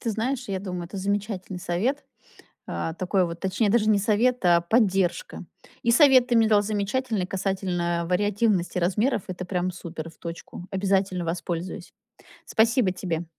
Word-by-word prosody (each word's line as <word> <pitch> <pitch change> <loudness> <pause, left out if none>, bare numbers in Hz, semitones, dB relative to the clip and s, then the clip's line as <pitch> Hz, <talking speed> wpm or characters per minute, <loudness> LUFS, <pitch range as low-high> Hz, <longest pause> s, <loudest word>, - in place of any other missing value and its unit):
Ты 230 - -2
знаешь, 235 +3 -2
я 190 -1 -1
думаю, 180 -3 -5
это 190 +4 -9
замечательный 195 -1 -3
совет. 220 +13 -1 0.6
А, 160 - -3
такой 185 0 +1
вот 170 0 -7
точнее, 200 +3 0
даже 220 -1 +3
не 205 - +4
совет, 225 +2 +1
а 170 -1 +5
поддержка. 190 -4 +1 0.4
И 235 - +2
совет 260 -2 +6
ты 240 - +3
мне 225 -1 +4
дал 205 -1 +4
замечательный 215 0 -1
касательно 180 -3 -1
вариативности 205 -1 +1
размеров. 200 +5 +1
Это 185 0 -5
прям 180 0 -1
супер. 165 -2 -7
В - - -22
точку. 170 +1 -8
Обязательно 190 -2 0
воспользуюсь. 175 +1 -4 0.5
Спасибо 225 -3 +2
тебе! 175 -2 -3
190 Hz, 150 wpm, -25 LUFS, 180-220 Hz, 0.6 s, совет